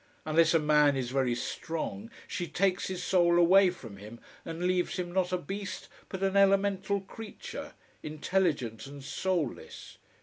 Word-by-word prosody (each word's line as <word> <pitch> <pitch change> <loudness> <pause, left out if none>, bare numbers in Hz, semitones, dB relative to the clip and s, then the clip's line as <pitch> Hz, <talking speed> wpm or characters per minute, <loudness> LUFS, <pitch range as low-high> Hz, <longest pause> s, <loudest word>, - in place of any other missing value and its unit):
Unless 160 +1 +4
a - - +6
man 150 -2 +4
is 125 -2 -3
very 130 -3 +1
strong, 165 - -4 0.2
she 175 - -3
takes 185 +3 0
his 185 -1 -4
soul 175 -2 +3
away 185 +2 +6
from 115 - -9
him 105 +4 -11 0.2
and 165 +1 -5
leaves 180 -1 +1
him 175 -1 -3
not 180 0 0
a 180 - +1
beast, 195 +4 -6 0.2
but 190 0 -5
an 195 0 +1
elemental 195 0 +3
creature, 215 +3 -8 0.3
intelligent 150 - -1
and 140 0 -10
soulless. 165 -1 -3
175 Hz, 155 wpm, -30 LUFS, 150-190 Hz, 0.3 s, a